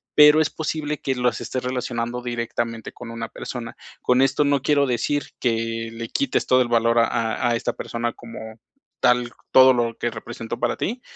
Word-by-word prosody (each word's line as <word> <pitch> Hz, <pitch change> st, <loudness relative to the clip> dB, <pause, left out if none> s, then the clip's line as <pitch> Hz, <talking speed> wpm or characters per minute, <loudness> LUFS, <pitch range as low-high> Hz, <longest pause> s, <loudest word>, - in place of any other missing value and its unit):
pero 150 Hz, +1 st, +8 dB
es 155 Hz, -, +1 dB
posible 150 Hz, -1 st, -3 dB
que 135 Hz, -, -1 dB
los 125 Hz, -2 st, 0 dB
estés 130 Hz, -, -3 dB
relacionando 125 Hz, -1 st, -3 dB
directamente 115 Hz, -1 st, -3 dB
con 120 Hz, -2 st, -9 dB
una 115 Hz, 0 st, -5 dB
persona. 115 Hz, +1 st, -7 dB, 0.3 s
Con 125 Hz, +1 st, +3 dB
esto 135 Hz, +2 st, +3 dB
no 140 Hz, -2 st, +2 dB
quiero 145 Hz, -1 st, +3 dB
decir 135 Hz, +4 st, 0 dB, 0.2 s
que 115 Hz, -1 st, -1 dB
le 115 Hz, 0 st, -6 dB
quites 275 Hz, -, 0 dB
todo 130 Hz, 0 st, +5 dB
el 120 Hz, -, 0 dB
valor 115 Hz, 0 st, +3 dB
a 115 Hz, -, +5 dB
a 115 Hz, +1 st, 0 dB
a 120 Hz, -, +2 dB
esta 115 Hz, -, -2 dB
persona 120 Hz, 0 st, -3 dB
como 115 Hz, -1 st, -10 dB, 0.6 s
tal, 125 Hz, -1 st, +3 dB, 0.2 s
todo 130 Hz, 0 st, +8 dB
lo 115 Hz, -2 st, -1 dB
que 120 Hz, -, -1 dB
representó 115 Hz, +1 st, -7 dB
para 120 Hz, -, 0 dB
ti, 245 Hz, +4 st, -3 dB
120 Hz, 190 wpm, -23 LUFS, 115-130 Hz, 0.6 s, pero